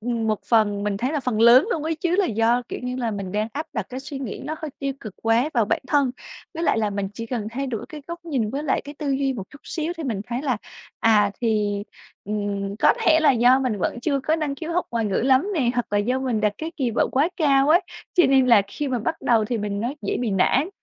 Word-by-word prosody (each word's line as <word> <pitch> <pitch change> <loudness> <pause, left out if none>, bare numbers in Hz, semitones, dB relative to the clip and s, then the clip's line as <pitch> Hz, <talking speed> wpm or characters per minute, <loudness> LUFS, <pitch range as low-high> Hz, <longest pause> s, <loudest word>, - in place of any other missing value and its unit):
ừm, 230 0 -2
một 215 -1 0
phần 210 -3 +3
mình 205 -1 -1
thấy 250 +8 -1
là 300 - 0
phần 245 -5 -1
lớn 240 - +7
luôn 320 - -1
ấy 320 +1 -1
chứ, 350 +3 0
là 400 - +3
do, 230 +2 +2
kiểu - - -5
như 250 0 -3
là, 240 -3 -1
mình 195 -3 -5
đang 215 +2 -1
áp 305 +4 -4
đặt 220 -7 -3
cái 255 +1 -6
suy 275 0 -7
nghĩ 255 -7 -6
nó 310 +2 -3
hơi 315 -2 -5
tiêu 275 -1 -2
cực 215 -4 -8
quá 230 +6 +2
vào 230 - +3
bản 210 - 0
thân, 280 -3 +3 0.4
với 330 - -4
lại 275 - +2
là 215 -2 0
mình 200 -1 -2
chỉ 230 +2 -6
cần 230 -3 -3
thay 270 +4 -3
đổi 230 -5 -4
cái 305 -2 -9
góc 340 0 -7
nhìn 255 -10 -1
với 280 +4 -3
lại 285 - 0
cái 290 +1 -9
tư 290 -3 -2
duy 270 0 +1
một 230 -7 -5
chút 285 - -14
xíu 320 +1 -3
thì 325 - -5
mình 220 -7 -2
thấy 245 +3 -3
là, 255 -6 0 0.4
à, 210 -3 +4
thì, 210 -3 0 0.4
ừm, 200 -1 -3
có - - +5
thể 315 - +5
là 300 -3 +5
do 245 +2 +5
mình 240 -6 -1
vẫn 240 - -2
chưa 280 +1 0
có 315 +4 +1
năng 295 -3 -2
khiếu 330 +3 -5
học 355 - +1
ngoại 230 -2 -1
ngữ 200 - -1
lắm 265 - +3
nè 255 -7 +2
hoặc 245 - 0
là 205 - +2
do 250 +5 0
mình 250 -5 -1
đặt 210 -1 +2
cái 320 +2 -5
kỳ 260 -5 0
vọng 230 - +1
quá 285 +6 +3
cao 280 -3 +3
ấy, 340 +4 +6 0.3
cho 355 - +5
nên 265 -1 +4
là 230 -5 +6
khi 290 +7 -4
mà 250 -2 0
bắt 320 +9 -3
đầu 230 -3 +3
thì 235 +2 -2
mình 205 -1 -3
nói 250 +6 -3
dễ - - -1
bị 235 -4 -1
nản. 245 - +2
250 Hz, 275 wpm, -23 LUFS, 215-285 Hz, 0.4 s, lớn